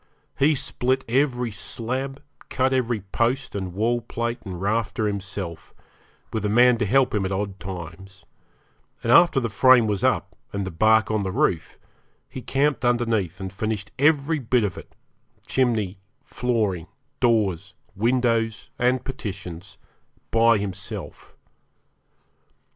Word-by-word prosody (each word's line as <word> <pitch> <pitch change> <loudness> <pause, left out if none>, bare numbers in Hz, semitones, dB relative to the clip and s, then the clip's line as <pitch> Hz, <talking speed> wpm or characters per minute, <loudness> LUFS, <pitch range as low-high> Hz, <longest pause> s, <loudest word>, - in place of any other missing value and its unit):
He 150 +2 +4
split 130 0 -1
every 125 -1 +1
slab, 130 +7 -4 0.3
cut 130 +1 +1
every 120 -4 0
post 120 +7 -1
and 95 -3 -4
wallplate 115 +2 -1
and 95 -4 -6
rafter 110 +3 -1
himself, 95 -4 -5 0.6
with 110 -2 -2
a 105 - 0
man 120 +2 +5
to 110 - 0
help 135 +4 +3
him 105 -2 +1
at 95 - -2
odd 95 0 -3
times; 95 +1 -9 0.8
and 115 - +1
after 170 0 +6
the 120 - -1
frame 120 +3 +5
was 105 -3 -1
up, - - +1 0.2
and 100 -1 -3
the 95 - -4
bark 110 +6 +3
on 110 -1 +1
the 95 -1 -2
roof, 85 -3 0 0.5
he 130 - -8
camped 140 +2 0
underneath 115 -7 +1
and 95 -1 -6
finished 105 0 -3
every 150 +1 +3
bit 120 -2 +1
of 100 -4 -1
it - - -12 0.5
chimney, 110 -7 0 0.2
flooring, 105 -9 -1 0.3
doors, 100 -6 +1 0.2
windows, 115 0 0
and 125 +1 +1
partitions 95 -7 -7 0.5
by 115 0 +5
himself. 100 -1 -6
110 Hz, 130 wpm, -24 LUFS, 100-125 Hz, 0.8 s, after